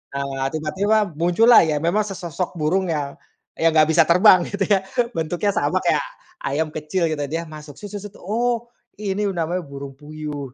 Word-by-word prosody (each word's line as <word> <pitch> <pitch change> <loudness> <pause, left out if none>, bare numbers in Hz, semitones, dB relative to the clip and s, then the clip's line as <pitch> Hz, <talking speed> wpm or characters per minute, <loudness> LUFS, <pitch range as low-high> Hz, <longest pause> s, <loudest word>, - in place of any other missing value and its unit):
Nah, 135 -1 -2
tiba-tiba 190 +7 0
muncullah 220 +8 +6
ya 150 -1 0
memang 190 +6 +2
sesosok 180 -2 -4
burung 180 +5 +1
yang 145 -3 -2 0.4
yang 165 -1 +3
nggak 155 0 +5
bisa 160 +1 +5
terbang, 180 +1 +6
gitu 200 -1 -3
ya. 195 -2 +3 0.3
Bentuknya 175 +5 -1
sama - - 0
kayak - - +1 0.4
ayam 155 +3 -1
kecil 160 +3 -2
gitu. 145 -2 -2
Dia 160 +4 -3
masuk 150 -1 -10
se 205 +7 -10
se 205 - -6
set, 205 0 -9
oh, 235 +4 -1 0.3
ini 205 0 -1
namanya 175 0 -2
burung 140 -1 -9
puyuh, 150 -3 -7
165 Hz, 170 wpm, -22 LUFS, 150-195 Hz, 0.4 s, muncullah